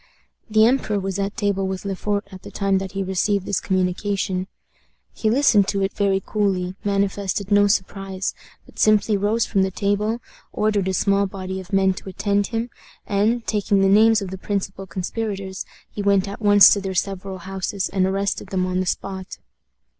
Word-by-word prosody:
The 215 0 +5
emperor 230 -4 +1
was 195 0 -3
at 200 +1 -2
table 200 -3 0
with 190 +1 -4
Le 195 -1 -2
Fort 205 +1 -2
at 190 -1 -10
the - - -10
time 195 -1 0
that 195 +1 -6
he 195 0 -2
received 190 +1 0
this 190 - 0
communication. 185 0 -1 0.7
He 220 - 0
listened 220 -5 +4
to 195 -1 0
it 195 - -1
very 195 -1 +1
coolly 190 -4 0
manifested 200 0 -1
no 205 0 +5
surprise 195 -1 -2 0.3
but - - -16
simply 215 0 +4
rose 210 +3 +1
from 195 - +1
the 190 - +2
table, 205 +4 -1 0.3
ordered 210 -3 0
a 190 - 0
small 200 +1 +2
body 190 0 -5
of 185 -1 -11
men 190 -1 +3
to 190 - -9
attend 200 +1 0
him, 230 +1 -3 0.3
and, 220 +3 +1
taking 205 -2 +1
the 195 - +4
names 220 +1 +5
of 185 - -6
the 190 - -6
principal 195 -1 -3
conspirators, 190 +1 -4 0.2
he 205 - -6
went 200 -1 +2
at 200 +2 -7
once 205 -1 +8
to 200 - +2
their 190 -1 -4
several 195 +1 -2
houses 190 +1 -3
and 190 -1 +1
arrested 195 0 -1
them 185 -1 -1
on 185 0 -1
the 185 - -1
spot. 190 0 -4
195 Hz, 185 wpm, -22 LUFS, 190-205 Hz, 0.7 s, once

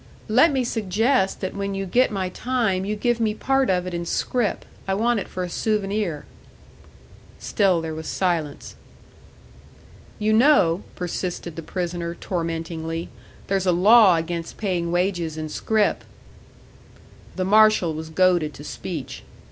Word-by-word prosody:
"Let 260 +9 +5
me 265 -2 0
suggest 225 0 0
that 185 - -3
when 200 0 -3
you 195 0 -3
get 245 +8 +3
my 190 -4 -2
time, 220 -4 -1
you 210 +1 -2
give 240 +2 0
me 215 -2 0
part 270 +2 +1
of 180 -1 +1
it 185 - -5
in 170 0 -2
scrip. 230 +6 -1 0.2
I 190 - +1
want 235 +2 +1
it - - -6
for 185 - -4
a - - -3
souvenir." 200 -4 -1 1.1
Still 190 -6 +1
there 160 -1 -4
was 160 0 -6
silence. 165 -6 -2 1.4
"You 215 0 +1
know," 220 - +4
persisted 175 -1 -4
the 165 - -5
prisoner, 170 0 -4
tormentingly, 165 -1 -4 0.4
"there's 195 -1 -1
a - - +5
law 200 +2 +6
against 165 0 -4
paying 180 -5 -1
wages 175 -3 -1
in 155 0 -4
scrip." 215 +5 0 1.3
The 185 - -1
marshal 215 -4 +4
was 160 +1 -6
goaded 175 -2 +2
to - - -10
speech. - - -6
185 Hz, 145 wpm, -23 LUFS, 170-215 Hz, 1.4 s, law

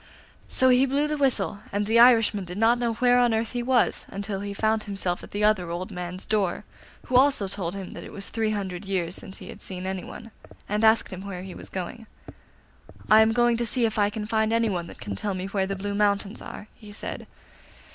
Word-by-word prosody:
So 260 - +3
he 255 +2 +5
blew 285 +3 +1
the 300 - -1
whistle, 265 -6 +1
and 205 +1 0
the 225 +2 +3
Irishman 225 -4 +6
did 180 +1 -7
not 230 +2 +4
know 235 -1 0
where 245 +2 +4
on 240 -2 +3
earth 225 0 -1
he 245 - -2
was 245 -1 +2
until 200 0 -4
he 200 0 -5
found 215 +2 0
himself 195 -3 -2
at - - -11
the 205 +1 -3
other 200 -5 +3
old 175 +2 -4
man's 180 +1 -6
door, 200 -5 0 0.4
who 255 - -2
also 260 -6 +4
told 190 -2 -4
him 195 -2 -6
that - - -8
it - - -10
was 200 - -7
three 225 -1 -1
hundred 195 -4 -3
years 185 -3 -2
since 190 - -6
he - - -10
had - - -10
seen 185 -1 -4
anyone, 190 +4 -6 0.4
and 210 +2 -1
asked 220 -2 +4
him 185 - -6
where 190 -2 -6
he 190 -1 -8
was - - -10
going. 195 +5 -6 1.0
'I 215 +1 +9
am 220 0 +4
going 240 0 +3
to 235 - -1
see 240 +1 +1
if 220 -1 -1
I 205 0 +3
can 210 0 -5
find 220 0 +1
anyone 215 -7 0
that - - -12
can 105 -5 -5
tell 200 - -2
me 185 0 -4
where 195 -1 -1
the 195 - -2
Blue 200 +1 -4
Mountains 200 +1 0
are,' 210 - -9
he 210 -3 -13
said. 205 - -6
210 Hz, 230 wpm, -26 LUFS, 190-230 Hz, 1.0 s, I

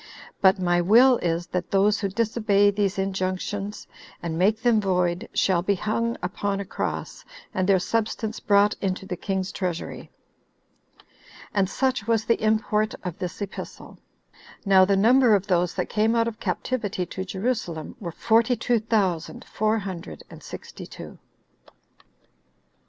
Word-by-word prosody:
But 190 +1 +5
my 175 -1 +2
will 240 +8 +6
is, 170 0 -1
that 180 0 -4
those 205 +2 +3
who 200 - -1
disobey 210 -1 +2
these 200 -1 -1
injunctions, 195 +1 -3 0.4
and 165 -2 -3
make 200 +6 +2
them 235 -3 +4
void, 180 0 0
shall 180 -3 +2
be 200 +3 +1
hung 230 +4 -1
upon 195 +2 -2
a 200 - -4
cross, - - -4 0.3
and 185 +1 0
their 195 - +6
substance 220 +3 -2
brought 205 0 +3
into 195 -1 -2
the 190 -2 -4
king's 190 +1 -3
treasury." 180 -3 -4 1.4
And 195 -3 +1
such 255 -2 -1
was 225 -1 +1
the 230 - +1
import 215 0 +1
of 180 -2 -5
this 180 +3 -4
epistle. 200 - -9 0.7
Now 190 -1 +6
the 195 0 +2
number 235 +2 +5
of 200 -1 0
those 180 -3 +1
that - - -1
came 220 +2 +1
out 230 0 +2
of 225 -1 -5
captivity 205 -7 -2
to 190 - -5
Jerusalem, 190 -5 -3
were 175 -5 -5
forty 230 +6 +2
two 240 -1 +1
thousand 200 -7 -1
four 215 +1 0
hundred 190 -4 -7
and - - -11
sixty - - -9
two. - - -11
200 Hz, 150 wpm, -25 LUFS, 185-220 Hz, 1.4 s, will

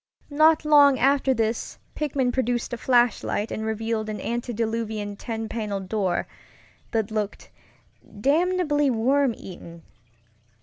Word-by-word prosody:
Not 310 +2 +4
long 285 -3 +6
after 270 +1 +3
this 225 -2 -1 0.2
Pickman 275 -4 0
produced 245 -1 -1
a - - -2
flashlight 240 -3 +1
and 220 - -3
revealed 220 0 -2
an 210 - -4
antediluvian 225 -3 -3
ten 225 +1 -5
paneled 205 -4 -4
door 190 -5 0 0.6
that 220 -1 -1
looked 210 -1 -4 0.7
damnably 295 - +2
worm 255 +2 +2
eaten. 170 -2 -11
230 Hz, 115 wpm, -24 LUFS, 215-275 Hz, 0.7 s, long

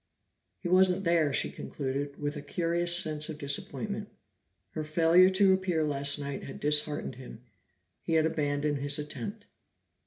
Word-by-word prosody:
He 180 - -4
wasn't 185 +1 +4
there, 170 -4 +2
she - - +1
concluded, 140 +1 -4
with 145 +1 -3
a 145 - -5
curious 170 +2 +1
sense 155 -2 -1
of 155 - -6
disappointment; 200 +9 -4 0.6
her 155 - -4
failure 165 +4 +5
to 190 0 +4
appear 185 -4 0
last 140 -1 0
night 140 -1 -5
had 135 - -8
disheartened 150 -3 +1
him; 125 -2 -11 0.6
he 165 - -3
had 160 -1 +4
abandoned 145 -2 -1
his 140 +1 0
attempt. 200 +8 -6
155 Hz, 150 wpm, -29 LUFS, 145-175 Hz, 0.6 s, failure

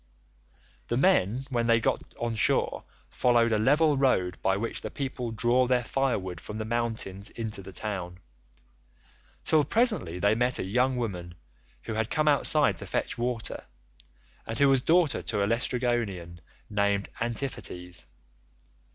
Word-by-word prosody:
"The 120 - 0
men 130 - +2
when 120 -2 0
they 115 -1 +5
got - - 0 0.2
on 120 -1 -1
shore 110 - +1 0.3
followed 120 -2 +3
a 110 - +2
level 145 +5 +4
road 95 -10 +1
by 95 0 +2
which 115 +3 -3
the - - -5
people 130 -3 -4
draw 120 +3 +2
their 125 -1 +2
firewood 100 -10 -1
from 105 - -7
the 110 - -3
mountains 110 -4 -2
into 110 -3 -5
the 95 +1 -10
town, 90 -3 -4 1.3
till 155 -2 +4
presently 150 - +1
they 100 +3 +3
met 125 +3 +2
a - - -3
young 125 +6 +1
woman 90 -8 -4 0.5
who 115 - -4
had 110 0 -1
come 155 -1 0
outside 145 - +3
to - - -4
fetch - - -2
water, 120 -1 -3 0.8
and 110 - -4
who 140 +1 +5
was 135 -2 +4
daughter 165 +1 +3
to 105 -3 -1
a - - +3
Laestrygonian 115 -7 -1 0.3
named 100 -1 0
Antiphates. 105 -7 -3
115 Hz, 150 wpm, -28 LUFS, 100-130 Hz, 1.3 s, they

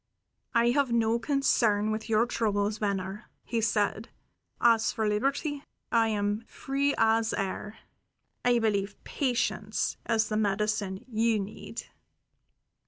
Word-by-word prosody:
"I 235 +1 +4
have 275 -1 +1
no 230 0 +2
concern 225 -6 +2
with 220 +1 -4
your 220 +1 +4
troubles, 210 -3 0
Venner," 200 0 -3
he 230 -1 -1
said. 210 0 0 0.5
"As 230 -2 +4
for 220 -1 -1
liberty, 275 +7 -1 0.3
I 230 -1 +4
am 205 0 0
free 280 +1 -1
as 225 0 +3
air. 200 +2 -4 0.7
I 245 -1 +4
believe 205 -3 0
patience 235 -5 -1
is 225 -1 +2
the 215 - -1
medicine 210 0 -1
you 225 -1 +1
need." 200 +1 -6
220 Hz, 120 wpm, -28 LUFS, 210-235 Hz, 0.7 s, I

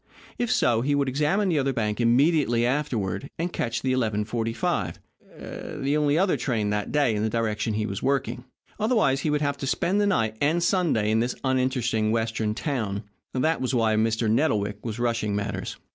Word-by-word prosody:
If 240 -2 0
so, 115 -1 +3
he 145 +3 +1
could 140 -1 +1
examine 150 +10 +1
the 160 -4 +2
other 135 0 0
bank 105 -1 -1
immediately 120 0 +3
afterward, 125 -4 -1
and 175 +2 -2
catch 115 -1 -2
the 130 -1 +1
11.45, 115 -1 -1 0.9
the 140 +2 +1
only 150 0 +2
other 190 +1 +2
train 110 -6 -1
that 105 0 -2
day 145 -6 +2
in 105 - -1
the 110 - +1
direction 110 -1 -1
he 105 0 -1
was 95 -2 -4
working. 135 0 -1 0.4
Otherwise, 215 - +2
he 150 - -1
would 150 0 +1
have 140 -1 0
to 135 - -4
spend 190 +8 +1
the 205 - +2
night 110 - +1
and 160 +4 +2
Sunday 160 - +2
in 110 - +3
this 120 +2 -1
uninteresting 125 -4 +1
Western 110 -1 -1
town. 110 -8 -2 0.3
That 155 +5 +1
was 130 0 0
why 110 -2 +2
Mr. 110 +1 +1
Nettlewick 105 -5 +1
was 115 -2 -4
rushing 115 -4 0
matters. 100 -2 -3
120 Hz, 185 wpm, -25 LUFS, 110-145 Hz, 0.9 s, so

